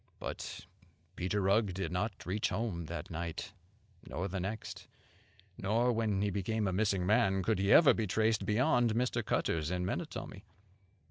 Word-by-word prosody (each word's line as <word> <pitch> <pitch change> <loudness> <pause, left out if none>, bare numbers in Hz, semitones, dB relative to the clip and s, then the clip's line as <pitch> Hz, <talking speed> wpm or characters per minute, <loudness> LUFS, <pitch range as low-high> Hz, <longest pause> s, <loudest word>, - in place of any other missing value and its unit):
But - - -6 0.5
Peter 95 +3 -1
Rugg 100 0 +2
did 95 -4 -3
not 90 -1 -3
reach 100 +5 0
home 90 -4 -2
that 85 +2 -6
night, 85 +4 -5 0.6
nor 95 +3 -3
the 95 0 -3
next; 100 +4 -5 0.7
nor, 115 +5 +2
when 110 -3 0
he 100 - 0
became 105 +2 -1
a 95 - -1
missing 100 -2 +1
man, 95 -2 +3
could 110 0 +1
he 100 +1 +2
ever 160 - +8
be 110 -2 -1
traced 110 +2 +1
beyond 115 +2 +2
Mr. 125 +2 0
Cutter's 80 -2 0
in 90 0 -1
Menotomy. - - -5
100 Hz, 155 wpm, -33 LUFS, 90-110 Hz, 0.7 s, ever